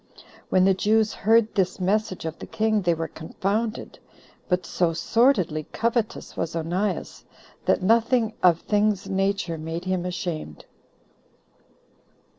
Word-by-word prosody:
When 185 0 +4
the 195 - +5
Jews 215 +3 +2
heard 225 +1 +3
this 185 -2 0
message 190 -1 0
of 160 0 -5
the - - -8
king, 220 -1 +1
they 175 -2 +2
were 165 0 -3
confounded; 205 +9 -3 0.5
but 180 0 +1
so 170 -2 0
sordidly 180 - +2
covetous 230 -1 -2
was 165 - -3
Onias, 180 +5 -2 0.4
that - - +2
nothing 230 +2 +3
of 170 -2 +4
things 210 -2 +1
nature 195 -3 -1
made 165 +3 -5
him 185 -1 -1
ashamed. 175 - -5
190 Hz, 125 wpm, -24 LUFS, 170-215 Hz, 0.5 s, the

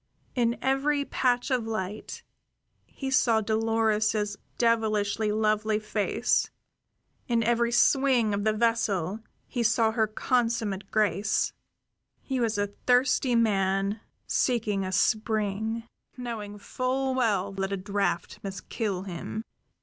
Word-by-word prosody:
In 235 -1 +1
every 280 +2 +1
patch 250 -1 0
of 245 -3 0
light 215 -1 -5 0.6
he 270 -1 -5
saw 230 -4 +4
Dolores's 220 -1 +1 0.2
devilishly 220 -2 +1
lovely 215 0 +1
face; 210 -1 0 0.8
in 235 -1 +2
every 235 +1 +2
swing 245 -2 +3
of 200 0 -1
the 215 - +3
vessel 215 -4 0 0.3
he 245 - -2
saw 225 -1 +3
her 220 -1 +1
consummate 220 -4 -1
grace; 210 -1 +1 0.7
he 265 -2 -3
was 225 -3 0
a 205 0 -1 0.2
thirsty 250 0 +3
man 200 -2 +1 0.2
seeking 215 -6 0
a 185 - -3
spring, 215 +2 0 0.3
knowing 220 -4 -5
full 260 +5 -1
well 205 -6 +1
that 195 0 -3
a 195 - -1
draft 190 -3 -2
must 195 -1 -7
kill 200 -5 -2
him. 195 +4 -5
220 Hz, 120 wpm, -27 LUFS, 205-235 Hz, 0.8 s, saw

